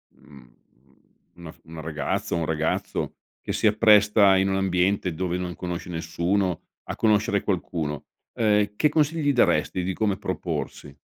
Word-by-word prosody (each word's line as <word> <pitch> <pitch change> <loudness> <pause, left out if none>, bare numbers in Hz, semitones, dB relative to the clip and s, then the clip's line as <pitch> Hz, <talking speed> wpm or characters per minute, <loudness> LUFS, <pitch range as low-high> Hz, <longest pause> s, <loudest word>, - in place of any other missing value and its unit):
mhmm, 70 -5 -18 0.8
una 85 -2 -10
f - - -23
una 80 0 -9
ragazza, 80 +1 -3
un 85 -1 -1
ragazzo, 80 0 -2 0.2
che - - -4
si - - +2
appresta 105 -2 +5
in 95 +1 +2
un 95 - 0
ambiente 95 -1 +1
dove 90 +1 -2
non 90 -1 -4
conosce 90 0 -5
nessuno 85 +2 -1 0.2
a - - -5
conoscere 105 -2 +2
qualcuno, 80 -6 -3 0.3
ehm, 105 -2 +2
che 150 - +3
consigli 150 0 +1
daresti 95 -6 +2
di 95 +1 -2
come 100 -1 0
proporsi? 70 -5 -5
95 Hz, 145 wpm, -24 LUFS, 85-105 Hz, 0.8 s, appresta